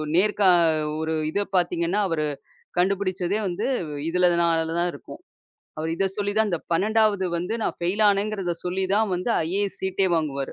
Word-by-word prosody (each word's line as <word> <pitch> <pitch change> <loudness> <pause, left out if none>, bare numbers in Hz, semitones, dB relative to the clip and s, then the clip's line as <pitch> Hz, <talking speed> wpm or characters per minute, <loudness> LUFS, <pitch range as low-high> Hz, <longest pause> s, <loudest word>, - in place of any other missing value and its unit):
நேர்கா 200 +1 +4 0.5
ஒரு 160 0 -2 0.2
இதைப் 200 +1 -3
பாத்தீங்கன்னா, 175 +2 +1
அவரு 155 -2 0 0.5
கண்டுபுடிச்சதே 190 +1 0
வந்து 175 - -3 0.4
இதுனால 170 -2 +2
தான் 175 0 +1
இருக்கும். - - -11 0.6
அவரு 160 +1 -2
இத 195 - +1
சொல்லித் 205 +1 -1
தான் 220 -1 +3
அந்த 170 - -1
12ஆவது 210 +1 +2
வந்து 180 +6 -3
நான் - - -2
ஃபெயில் 180 +5 0
ஆனேன்ங்கிறத 200 -3 -1
சொல்லி 185 +2 -1
தான் 215 0 +2
வந்து, 180 +6 -2 0.2
ஐஏஎஸ் 200 +2 -2
சீட்டே 190 0 +1
வாங்குவாரு. 140 -4 -2
185 Hz, 150 wpm, -24 LUFS, 170-205 Hz, 0.6 s, நேர்கா